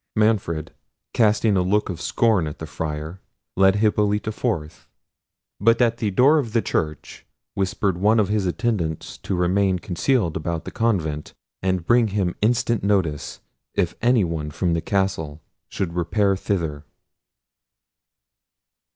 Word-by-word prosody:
Manfred, 100 -8 0 0.4
casting 105 -2 +3
a 95 - +3
look 100 +4 +1
of 85 -3 -5
scorn 110 -9 +2
at 75 - -6
the 80 - -6
Friar, 80 +3 -5 0.3
led 95 0 +4
Hippolita 105 0 +1
forth; 95 -10 -3 0.7
but 115 +3 +4
at 115 -2 +2
the 110 -3 -1
door 135 +10 +4
of 115 -6 -4
the 115 - +3
church 75 -2 -3 0.3
whispered 95 -1 -1
one 110 +4 +4
of 105 - +2
his 105 -2 0
attendants 90 -5 -2
to 95 - -3
remain 95 +2 +2
concealed 90 - 0
about 80 +1 -3
the - - -6
convent, 80 -10 -1 0.3
and 95 -2 -1
bring 120 +2 +4
him 95 -3 -1
instant 115 0 +1
notice, 95 -8 -1 0.3
if 90 -3 0
any 120 -2 +4
one 80 -3 -3
from 85 +3 -1
the 85 - 0
castle 95 -6 -1 0.3
should 90 -4 -3
repair 100 +3 +1
thither. 80 -7 -2
95 Hz, 140 wpm, -23 LUFS, 85-110 Hz, 0.7 s, led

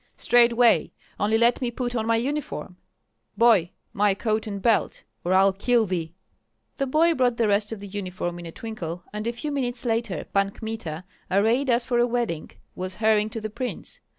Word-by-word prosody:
"Straightway, 240 -1 +4 0.3
only 215 +2 +2
let 235 +3 +3
me 250 - 0
put 245 0 -3
on 225 -1 -1
my 230 - +3
uniform. 260 -6 -3 0.6
Boy, 225 -8 +5 0.2
my 200 -1 +2
coat 215 +1 -1
and 200 -2 -4
belt, 225 +1 +1 0.2
or 175 - -1
I'll 195 +1 +5
kill 230 +4 +2
thee!" 170 -3 -3 0.6
The 275 - -1
boy 325 +5 +3
brought 250 -5 +1
the 230 - +2
rest 205 +1 +1
of 220 -3 -6
the 200 - -7
uniform 185 -3 -4
in 170 - -8
a - - -7
twinkle; 175 -5 -6
and 210 +2 -4
a - - +1
few 295 +6 -5
minutes 250 -3 -2
later 225 -4 -1
Pan 195 0 +2
Kmita, 200 -7 -6 0.3
arrayed 225 +8 +2
as 235 0 +2
for 240 -2 +1
a 240 - +4
wedding, 235 -10 -2 0.2
was 185 0 -5
hurrying 215 0 +2
to 225 - -5
the 215 0 -5
prince. 250 +3 -5
220 Hz, 190 wpm, -25 LUFS, 195-240 Hz, 0.6 s, Boy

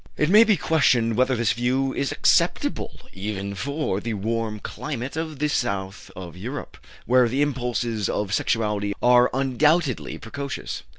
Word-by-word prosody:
It 150 +3 +1
may 215 +3 +8
be 215 -4 +3
questioned 125 -9 +2
whether 130 +2 +2
this 115 -5 +1
view 130 +3 0
is 140 - -1
acceptable - - +1
even 100 0 -4
for 140 - -2
the 115 +1 -3
warm 110 +1 -2
climate 125 +4 -5
of 160 -2 -4
the 150 +2 0
south 100 -8 -2
of 90 -3 -8
Europe, 125 +9 -7 0.3
where 125 -1 +4
the 135 +5 +1
impulses 120 -6 -2
of 100 -1 -2
sexuality 105 -3 0
are 125 0 +6
undoubtedly 135 +3 +1
precocious. 140 +4 -6
120 Hz, 145 wpm, -24 LUFS, 105-140 Hz, 0.3 s, may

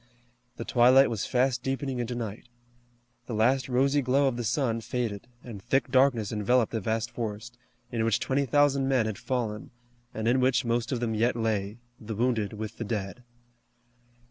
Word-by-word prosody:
The 115 - -5
twilight 130 +2 +5
was 110 -4 -2
fast 125 -1 +1
deepening 135 -1 -3
into 120 0 -3
night. 115 -1 -6 0.8
The 115 - -4
last 130 +5 +2
rosy 135 +3 +2
glow 135 +2 +2
of 130 - 0
the 120 - -3
sun 115 0 0
faded, 115 -3 -3 0.2
and 110 -5 -9
thick 135 +5 0
darkness 130 -6 +3
enveloped 115 +2 +1
the 115 - -1
vast 110 +4 -2
forest, 115 +1 -5 0.4
in 115 -2 -1
which 115 -2 +2
twenty 135 +1 0
thousand 140 0 +3
men 130 -4 +2
had 110 -2 -4
fallen, 115 -5 -3 0.4
and 110 0 -3
in 125 +2 +3
which 130 0 +2
most 115 +1 -1
of 125 -3 -2
them 115 -2 -1
yet 115 +3 +1
lay, 110 -2 -1 0.2
the 110 0 -6
wounded 110 -3 0
with 110 +1 -6
the - - -2
dead. 105 0 -4
120 Hz, 175 wpm, -27 LUFS, 110-130 Hz, 0.8 s, twilight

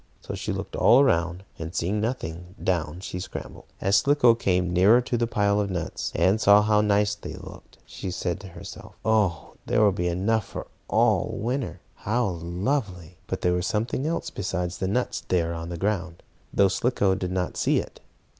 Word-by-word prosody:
So - - -7
she - - -3
looked - - -5
all 125 - +6
around, 90 -8 +2 0.2
and, 80 +2 -6
seeing 100 +5 0
nothing, 90 -6 -4
down 85 -1 -1
she 90 - -5
scrambled. 90 - -8
As 100 +1 +3
Slicko 140 0 +5
came 90 -5 0
nearer 100 +7 +6
to 125 0 -2
the 120 0 +1
pile 100 -2 +1
of 100 - -2
nuts, 90 -3 -3
and 95 +6 +3
saw 100 0 +7
how 105 0 +3
nice 105 0 +2
they 105 - -8
looked, - - -12
she 95 - -6
said 90 -1 -2
to 100 - -10
herself: 85 - -10
"Oh, 105 -8 +1
there - - +2
will 105 - +5
be 90 -2 -2
enough 100 +5 0
for - - -6 0.2
all - - +2
winter. 125 +3 -3 0.2
How 120 +4 0
lovely!" 90 - -3
But - - -3
there 90 - +2
was 90 0 -1
something 115 +6 -1
else 165 - -2
besides 90 -2 -3
the 95 - -1
nuts 125 +6 -1
there 85 -2 +1
on 85 0 -5
the 85 - -5
ground, 90 -3 -2 0.3
though 100 - +4
Slicko 100 -1 +1
did 90 -1 -3
not 90 -1 -2
see - - +2
it. - - -4
95 Hz, 190 wpm, -25 LUFS, 90-110 Hz, 0.3 s, saw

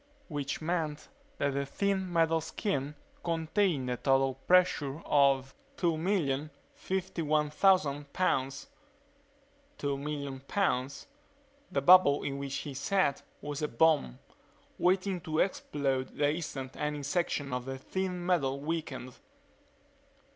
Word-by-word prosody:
Which 145 0 -3
meant 155 -3 -2 0.3
that 140 - 0
the 140 +1 0
thin 190 +3 -1
metal 165 -1 +3
skin 150 -5 -2 0.3
contained 165 -3 0
a 125 0 -1
total 135 0 +2
pressure 150 -1 +2
of 135 -2 +3 0.2
2,051,000 155 -1 0
pounds. 135 - 0 1.1
Two 140 -1 -2
million 140 -2 -4
pounds. 140 -4 -1 0.7
The 140 - 0
bubble 175 -4 +7
in 140 0 -3
which 140 -1 -4
he 145 - -4
sat 140 +2 +1 0.2
was 145 0 -5
a 150 - +1
bomb, 145 - +2 0.6
waiting 185 0 +2
to 155 -2 -3
explode 140 -7 -1
the 145 0 +3
instant 140 -5 -5
any 150 -1 -2
section 145 -3 -1
of 125 0 -2
the 135 0 -4
thin 180 +4 -3
metal 140 -7 +1
weakened. 145 -4 -4
150 Hz, 110 wpm, -31 LUFS, 135-175 Hz, 1.1 s, bubble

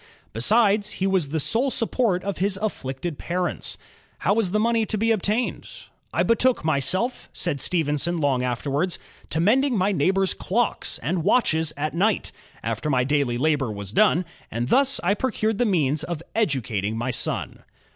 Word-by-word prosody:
Besides, 205 - +2
he 190 - -2
was 190 -7 +1
the 160 +2 -1
sole 235 - +2
support 230 -6 0
of 200 -2 -3
his 195 +1 0
afiiicted 150 -6 -4
parents. 180 +1 -2 0.4
How - - +1
was 215 -3 +1
the 210 +4 +1
money 230 +1 +2
to 215 - -2
be 225 +2 +2
obtained? 215 +3 0 0.4
''I - - +1
betook 235 -4 +2
myself," 170 - 0
said 150 -7 -2
Stephen 150 -4 0
son 175 +4 0
long 140 -5 +1
afterwards, 140 +8 -1 0.3
*'to 160 - -1
mending 245 +7 +3
my 195 +2 +2
neighbors' 190 +3 +1
clocks 235 +5 -1
and 165 +5 -1
watches 160 -7 +2
at 155 +1 -2
night, 200 +6 +1 0.3
after 150 - -2
my 130 -3 +2
daily 135 -3 +1
labor 145 -3 +1
was 100 -2 -5
done, 185 - +3 0.2
and 120 +3 -3
thus 275 +1 +3
I 185 +3 +3
procured 220 -2 -1
the 245 - +3
means 155 - +1
of 165 -1 -5
educating 115 - -1
my 120 +3 -1
son." 120 - -2
175 Hz, 165 wpm, -24 LUFS, 145-215 Hz, 0.4 s, mending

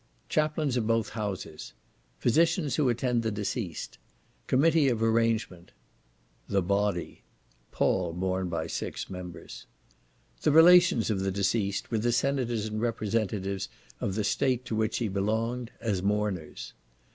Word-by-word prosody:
Chaplains 150 -3 +1
of 110 -3 0
both 115 -1 +1
Houses. 100 -7 -5 0.4
Physicians 160 +3 +2
who 145 -5 +2
attend 120 0 +1
the 115 - -1
deceased. 105 -3 -4 0.5
Committee 150 +1 +4
of 115 -3 0
arrangement. 115 -6 0 0.7
THE 100 -2 +1
BODY, 100 -1 -1 0.5
(Pall 90 -3 +1
borne 95 +1 -2
by 80 -2 -2
six 80 - -5
members.) 90 -2 -8 0.7
The 155 - +3
Relations 165 -7 +6
of 100 - 0
the 95 0 0
deceased, 100 +1 -1
with 110 -2 0
the 120 +1 +1
Senators 120 -3 0
and 110 0 -3
Representatives 105 -4 -1 0.3
of 95 - -2
the 105 - 0
State 125 +4 0
to 110 - -3
which 110 0 0
he 120 - -1
belonged, 110 +5 -1
as 105 -5 -1
Mourners. 100 -4 -2
110 Hz, 135 wpm, -28 LUFS, 100-120 Hz, 0.7 s, Relations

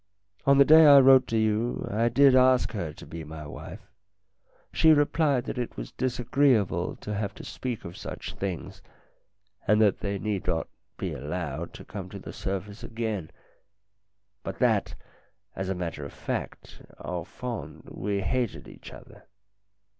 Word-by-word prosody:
On 140 0 +6
the 140 - +7
day 160 +1 +8
I 140 -1 +10
wrote 130 -1 +7
to 115 - 0
you 110 +2 0
I 115 +3 +2
did 135 +3 +5
ask 130 -2 +4
her 85 -8 -4
to 75 - -12
be 80 0 -7
my 75 0 -8
wife. 75 - -9 0.9
She 160 -1 +6
replied 145 -3 +2
that - - -5
it 120 - -4
was - - -6
disagreeable 125 -3 +1
to 105 - -6
have 100 -1 -3
to - - -10
speak 125 -3 -5
of 85 - -8
such - - -7
things, 95 -4 -5 0.9
and 105 +1 +4
that 105 -3 +3
they 100 0 -2
need 105 -1 -3
not 80 - 0 0.3
be - - -3
allowed 80 +2 -5
to - - -10
come 95 -3 -7
to 100 - -8
the 95 - -9
surface 100 +2 -5
again, 110 -7 -4 1.1
but 95 -1 -6
that, 110 -5 +1 0.6
as 95 0 -3
a 95 - -1
matter 85 -4 -4
of 70 - -8
fact, - - -6 0.2
au 90 -1 -4
fond 120 +5 -7
we 100 +1 -2
hated 120 +3 -2
one - - -13
another. - - -13
105 Hz, 160 wpm, -27 LUFS, 95-125 Hz, 1.1 s, I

